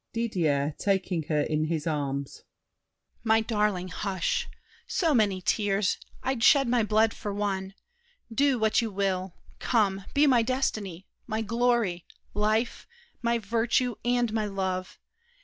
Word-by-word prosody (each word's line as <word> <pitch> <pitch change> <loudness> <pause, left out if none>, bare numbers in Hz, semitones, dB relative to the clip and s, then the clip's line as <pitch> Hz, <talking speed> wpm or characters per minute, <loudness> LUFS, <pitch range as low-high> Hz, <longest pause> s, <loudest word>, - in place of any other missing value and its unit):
DIDIER 160 -11 0
(taking 190 -3 0
her 150 -2 +2
in 155 +1 0
his 155 -1 -2
arms). 140 -3 -3 0.8
My 225 -1 +4
darling, 210 -5 0
hush! 190 -1 -2 0.4
So 330 -4 +1
many 205 -6 +2
tears! 200 -1 +1 0.2
I'd 260 -3 -1
shed 275 +1 +6
my 240 0 +3
blood 220 +1 +2
for 205 - -5
one. 195 -1 -2 0.6
Do 275 +1 +3
what 220 0 +2
you 230 - -2
will! 190 -2 -2 0.2
Come, 195 -5 +1
be 290 +1 +5
my 255 -5 +5
destiny, 215 -7 -2 0.2
My 220 -1 -2
glory, 230 -6 0 0.3
life, 215 +3 0 0.3
my 235 -1 +1
virtue, 235 +3 0
and 240 -2 +1
my 215 -2 0
love! 190 -2 -3
210 Hz, 130 wpm, -27 LUFS, 185-235 Hz, 0.8 s, shed